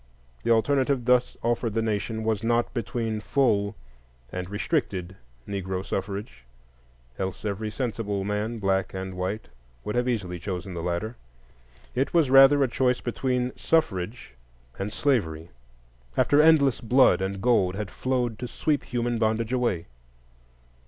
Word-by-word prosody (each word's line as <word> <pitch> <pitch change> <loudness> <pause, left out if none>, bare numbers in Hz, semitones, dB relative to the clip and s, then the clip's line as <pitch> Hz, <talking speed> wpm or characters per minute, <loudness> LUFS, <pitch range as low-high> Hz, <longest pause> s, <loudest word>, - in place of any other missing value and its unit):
The - - -3
alternative 130 +2 +2
thus 125 0 +3
offered 115 -1 0
the 115 - +2
nation 110 +1 -2
was 110 -1 0
not 120 +1 +1
between 115 -2 -2
full 105 -2 +1 0.6
and 90 0 -5
restricted 100 - -2 0.3
Negro 95 -1 -3
suffrage; 100 - -4 0.8
else 95 +2 -4
every 105 +1 -2
sensible 105 -4 -2
man, 105 +3 -2
black 95 -2 0
and 95 0 -4
white, 95 +4 -3 0.4
would 105 - -3
easily 100 -8 -2
have 85 - -15
chosen 95 0 -4
the 85 - -4
latter. 90 +7 -3 0.8
It 135 +6 -1
was 155 -6 +4
rather 135 +1 +8
a - - +3
choice 125 0 +1
between 125 0 -1
suffrage 110 - -1 0.5
and 100 +2 -3
slavery, 85 - 0 0.7
after 145 +1 +5
endless 150 -5 +5
blood 120 -6 +4
and 95 0 -2
gold 95 -5 +2
had 100 -2 -4
flowed 125 -4 -1
to 125 - -4
sweep 145 +3 -1
human 120 -1 -1
bondage 110 +1 0
away. 120 -10 0
110 Hz, 140 wpm, -26 LUFS, 95-125 Hz, 0.8 s, rather